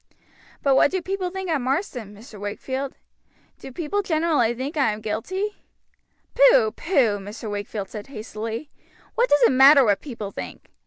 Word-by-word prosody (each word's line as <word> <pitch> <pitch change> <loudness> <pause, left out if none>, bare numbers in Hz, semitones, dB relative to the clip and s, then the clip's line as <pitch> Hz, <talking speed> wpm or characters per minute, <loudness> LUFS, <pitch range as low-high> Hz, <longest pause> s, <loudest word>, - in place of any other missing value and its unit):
"But 275 - +4
what 270 - +5
do 375 - -1
people 375 +1 -3
think 380 +1 -5
at 300 -4 +1
Marsden, 255 - -2
Mr. 215 0 -13
Wakefield? 260 +7 -4 0.6
Do 270 - -9
people 335 +9 -2
generally 315 - +1
think 270 +6 -5
I 270 -8 +2
am 210 - -7
guilty?" 375 - -3 0.8
"Pooh! - - +5
pooh!" 235 - +1
Mr. 210 +2 -7
Wakefield 205 0 -4
said 210 -2 -8
hastily. 225 +2 -6 0.4
"What 485 +2 +2
does 290 - +4
it - - +6
matter 270 +2 +7
what 205 -3 +2
people 225 -8 -7
think? - - -9
270 Hz, 160 wpm, -23 LUFS, 215-345 Hz, 0.8 s, matter